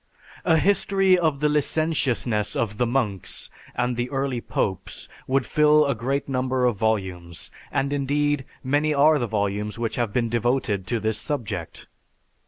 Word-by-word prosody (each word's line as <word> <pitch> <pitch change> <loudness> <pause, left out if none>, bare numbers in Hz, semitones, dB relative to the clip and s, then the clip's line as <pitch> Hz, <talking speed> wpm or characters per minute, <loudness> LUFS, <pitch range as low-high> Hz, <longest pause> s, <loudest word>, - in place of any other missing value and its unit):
A 165 -2 +5
history 195 +1 +3
of 160 -5 0
the 150 - +4
licentiousness 140 -8 0
of 110 -2 -2
the 125 - +2
monks 115 -7 -2 0.2
and 125 0 0
the 120 +1 -2
early 135 -3 -1
popes 95 -5 -3 0.2
would 130 -1 +1
fill 150 0 +4
a 140 - +1
great 135 +5 -2
number 130 -1 0
of 120 -3 +2
volumes; 95 -6 -2 0.2
and 140 +1 0
indeed, 145 0 +1 0.2
many 145 +3 +1
are 150 +2 +5
the 120 - -1
volumes 105 0 -2
which 115 -1 -2
have 120 -4 0
been 120 +1 +1
devoted 115 -4 0
to 115 +3 0
this 110 0 -1
subject. 105 - -4
125 Hz, 155 wpm, -24 LUFS, 110-145 Hz, 0.2 s, A